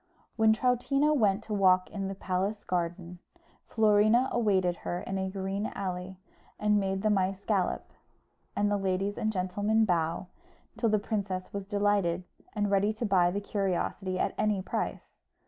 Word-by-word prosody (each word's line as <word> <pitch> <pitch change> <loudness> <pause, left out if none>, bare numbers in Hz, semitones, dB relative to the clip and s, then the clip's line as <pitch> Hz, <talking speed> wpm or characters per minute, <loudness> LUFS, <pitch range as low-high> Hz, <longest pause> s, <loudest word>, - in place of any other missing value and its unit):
When 220 -1 +4
Troutina 255 +6 +2
went 210 -6 +2
to 220 - -5
walk 185 -2 +3
in 195 -2 -3
the 195 - -4
palace 195 +3 -2
garden, 175 0 -3 0.5
Florina 215 +3 +4
awaited 190 -7 +1
her 175 - -4
in 195 0 -3
a 190 0 -2
green 195 +2 -3
alley, 185 -1 -4 0.4
and 210 0 +3
made 195 0 -2
the 215 - +3
mice 195 0 0
gallop, 195 -5 -1 0.6
and 205 0 +1
the 205 - +2
ladies 195 +1 -1
and 220 - -1
gentlemen 205 +3 +1
bow, 170 -2 0 0.5
till 230 - +1
the 215 - +3
princess 200 -3 -3
was 200 -1 -5
delighted, 200 -4 +1 0.3
and 205 -2 -1
ready 200 +2 +2
to 225 +2 -3
buy 185 -4 +4
the 200 +3 -2
curiosity 190 -1 -2
at - - 0
any 210 -2 +2
price. - - -4
200 Hz, 160 wpm, -29 LUFS, 185-210 Hz, 0.6 s, When